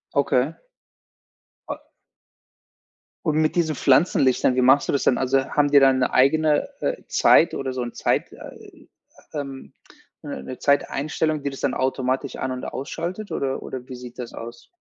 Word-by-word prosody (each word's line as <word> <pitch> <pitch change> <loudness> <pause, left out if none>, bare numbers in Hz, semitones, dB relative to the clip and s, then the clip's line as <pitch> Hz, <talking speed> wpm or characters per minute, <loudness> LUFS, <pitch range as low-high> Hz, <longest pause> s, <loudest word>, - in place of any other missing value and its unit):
Okay. 140 +1 +1 1.1
A - - -3 1.5
Und 155 -3 +1
mit 155 - +1
diesen 160 -3 +1
Pflanzenlichtern, 130 -3 +3
wie 130 - +2
machst 130 +3 +4
du - - 0
das 140 - 0
denn? 125 - +3
Also, 135 +1 +1
haben 145 -1 +2
die 145 - +8
dann 135 -1 +4
'ne 125 - 0
eigene, 150 - +3
äh, - - -2
Zeit 170 - +4
oder 135 -1 -3
so 130 - -3
'n 120 -1 -5
Zeit - - -1
äh, - - -13 0.5
ähm, 140 -3 -6 0.5
'ne 65 - -6
'ne 130 - -8
Zeiteinstellung, 150 +2 0
die 140 - -1
das 135 - -9
dann 140 - 0
automatisch 130 +1 -1
an 130 - -3
und 130 0 -5
ausschaltet 175 +8 -5
oder 135 -1 -2
oder 130 -1 -7
wie 130 - -7
sieht 125 -1 -11
das 120 -2 -6
aus? 115 +1 -9
135 Hz, 165 wpm, -23 LUFS, 130-150 Hz, 1.5 s, die